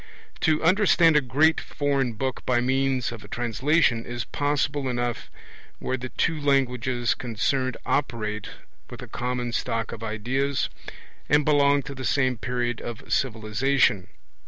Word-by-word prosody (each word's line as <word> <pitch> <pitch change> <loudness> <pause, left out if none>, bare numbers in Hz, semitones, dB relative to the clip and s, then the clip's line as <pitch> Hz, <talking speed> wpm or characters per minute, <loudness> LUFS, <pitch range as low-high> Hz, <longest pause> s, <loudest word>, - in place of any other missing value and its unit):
To 155 -1 +2
understand 175 -3 +5
a 150 - +6
great 145 +6 +3
foreign 140 -4 -1
book 130 +4 -3
by 120 -1 +2
means 130 -1 +1
of 115 -3 -9
a - - -12
translation 120 +2 +1
is 120 -1 -5
possible 145 -1 -1
enough 120 -1 -2 0.5
where 130 - -2
the 130 0 -6
two 160 +4 0
languages 125 -3 +1
concerned 125 +2 -1
operate 105 -6 -1 0.4
with - - -9
a - - -8
common 125 0 -3
stock 115 -1 -2
of 115 - -8
ideas, 130 +6 -1 0.6
and 145 +1 +4
belong 145 -1 +4
to 140 - -7
the 130 -1 -7
same 130 -4 +1
period 120 -1 -2
of 120 -2 -5
civilization. 115 -3 +1
130 Hz, 140 wpm, -25 LUFS, 120-140 Hz, 0.6 s, a